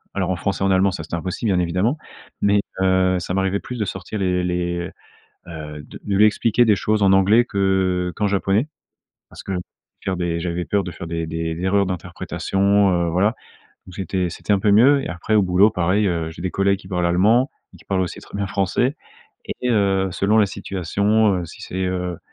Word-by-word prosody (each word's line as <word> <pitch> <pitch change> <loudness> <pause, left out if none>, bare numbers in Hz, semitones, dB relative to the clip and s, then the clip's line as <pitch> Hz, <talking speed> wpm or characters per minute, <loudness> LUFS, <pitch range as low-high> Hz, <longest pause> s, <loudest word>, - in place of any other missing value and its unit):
alors 95 -2 0
en - - 0
français 95 +2 -2
et - - +3
en - - +2
allemand, 95 +1 +4
ça, 95 - -5
c'était - - -5
impossible, 95 +6 -3
bien 90 - +2
évidemment 90 - 0 0.4
mais 100 0 +3 0.2
heu, 95 -1 +3
ça 90 +1 -4
m'arrivait 95 +1 0
plus 125 - -7
de 105 - -1
sortir 95 +2 -6
les 90 -2 0
les, 85 -1 -2 0.6
heu, 75 -3 -8
de - - -12
de 100 - -2
lui 105 - +6
expliquer 115 +2 +3
des 105 -3 +4
choses 105 +2 0
en 95 -1 +5
anglais 100 +5 +5
que 95 -4 0
qu'en 105 - 0
japonais 100 +5 +1 0.6
parce - - -12
que 95 - -5 0.5
faire 95 -1 -2
des 85 -1 -2
j'avais 85 0 -2
peur 100 +1 0
de 90 - -5
faire 85 - -8
des 85 0 -3
des 80 0 -3
erreurs 100 +2 +2
d'interprétation, 100 +2 0
heu, 85 -1 +1
voilà, 100 +7 +2 0.5
donc 90 - -12
j'étais 95 -2 -2
c'était 85 +4 -3
un 100 - +4
peu 100 +2 +2
mieux, 130 +8 +6
et - - -5
après 90 +5 -2
au 105 - +6
boulot 95 +3 +4
pareil, 95 +3 +1
heu, 85 -3 -1
j'ai 80 +1 -10
des 95 - -2
collègues 100 +1 +1
qui 95 - -14
parlent 90 -2 0
allemand 110 - +3 0.2
et - - -15
qui - - -19
parlent 95 -1 0
aussi 90 - -5
très - - -10
bien 100 0 -1
français 105 - 0 0.7
et 125 - +1
heu, 100 -3 +2
selon 100 +5 +1
la 105 - +6
situation, 100 +2 0
heu, 90 - -3
si 80 - -12
c'est, 95 0 -3
heu 90 -1 -3
95 Hz, 215 wpm, -21 LUFS, 90-100 Hz, 0.7 s, lui